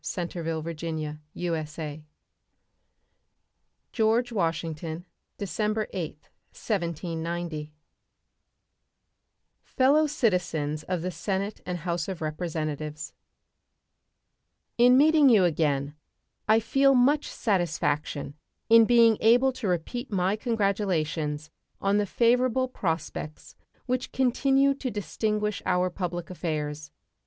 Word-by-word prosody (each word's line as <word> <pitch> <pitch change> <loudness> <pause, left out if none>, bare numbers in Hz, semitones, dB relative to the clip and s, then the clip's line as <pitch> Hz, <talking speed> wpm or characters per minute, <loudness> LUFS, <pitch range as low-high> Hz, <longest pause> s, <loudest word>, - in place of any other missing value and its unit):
State 175 -2 -4
of 170 -2 -4
the 165 0 -3
Union 155 -2 -4 0.2
Address 155 -3 -4 1.9
George 230 +2 +2
Washington 165 -3 -2 0.3
December 215 +2 -1
8, 170 -5 -3 0.4
1790 170 -4 -3 1.9
Fellow 285 +4 +3
Citizens 180 - 0
of 180 0 -3
the 185 - -2
Senate 200 +3 -3
and 180 - -2
House 170 -1 -2
of 190 -3 -5
Representatives: 155 -2 -4 1.7
In 250 +1 +7
meeting 300 0 +6
you 215 -6 +6
again 145 -4 +1 0.5
I 220 +1 +5
feel 275 +4 +3
much 280 +4 +3
satisfaction 155 - -1 0.4
in 230 0 +8
being 230 -2 +5
able 245 +4 +5
to 240 -4 -4
repeat 205 - -2
my 190 0 +1
congratulations 180 - -1 0.3
on 200 +1 +2
the 205 - 0
favorable 250 +3 +2
prospects 165 -8 -4 0.3
which 255 0 -2
continue 270 +2 +3
to 275 -1 -4
distinguish 210 0 -2
our 180 0 +2
public 175 -1 -4
affairs. 150 -4 -4
180 Hz, 100 wpm, -27 LUFS, 160-230 Hz, 1.9 s, in